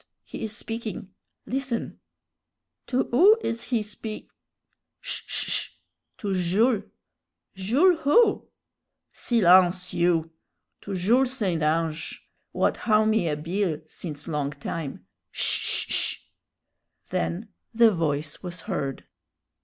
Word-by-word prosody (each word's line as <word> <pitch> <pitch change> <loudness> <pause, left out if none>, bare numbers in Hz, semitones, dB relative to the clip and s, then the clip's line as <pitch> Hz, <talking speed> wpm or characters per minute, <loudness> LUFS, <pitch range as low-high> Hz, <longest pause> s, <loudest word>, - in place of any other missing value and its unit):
he - - -8
is 215 -1 -3
speaking; 225 -4 -5 0.3
listen!" 255 -2 -3 0.9
"To 260 0 +1
who 380 - +7
is 230 0 -2
he 235 -4 0
speak 215 +1 -7 0.4
?" - - -53
"Sh - - -2
sh - - -1
sh! - - +1 0.5
to 200 -2 -2
Jules." 195 +6 +2 0.7
"Jules 275 - +3
who?" 410 +10 +3 0.6
"Silence, 185 -4 +4
you! 165 -2 +1 0.5
To 195 - -5
Jules 245 +8 +3
St. 180 -8 0
Ange, 160 +1 -1 0.2
what - - +1
howe 215 -1 +3
me 215 -6 +2
a 150 - -1
bill 165 0 -1
since 150 -2 -7
long 150 -3 -1
time. 140 - -6 0.2
Sh - - +2
sh - - -1
sh!" - - 0 0.9
Then 85 +1 -2 0.2
the 230 -1 +5
voice 155 -4 -2
was 180 -2 -6
heard. 140 - -4
190 Hz, 120 wpm, -26 LUFS, 165-230 Hz, 0.9 s, who